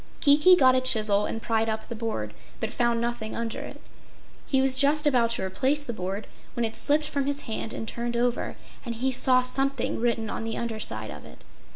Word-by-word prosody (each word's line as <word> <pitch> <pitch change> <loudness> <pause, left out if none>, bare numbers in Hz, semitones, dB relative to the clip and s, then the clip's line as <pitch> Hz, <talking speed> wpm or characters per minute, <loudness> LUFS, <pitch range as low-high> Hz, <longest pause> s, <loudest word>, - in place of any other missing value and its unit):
Kiki 300 +6 +6
got 260 -6 +5
a 255 - +2
chisel 215 -5 +3
and 225 - -5
pried 225 -1 0
up 220 0 -4
the 235 - -6
board, 215 - -4 0.3
but 220 - -3
found 235 -1 +1
nothing 235 -2 -3
under 230 -1 -4
it. - - -9 0.7
He 265 - +2
was 265 0 +2
just 290 +3 +4
about 245 -5 +3
to 190 - -2
replace 265 +10 0
the 240 - -4
board 195 +1 -5 0.3
when 240 -2 0
it 225 - -4
slipped 300 +1 +1
from 280 -2 -2
his 285 0 -1
hand 220 0 -4
and 220 - -5
turned 235 +1 -3
over, 245 0 -1 0.3
and 235 -2 -5
he 260 +4 -1
saw 255 0 +5
something 270 +2 -1
written 230 -1 0
on 215 - -5
the 225 0 -4
underside 215 - -4
of 75 0 -10
it. - - -15
235 Hz, 210 wpm, -26 LUFS, 220-265 Hz, 0.7 s, Kiki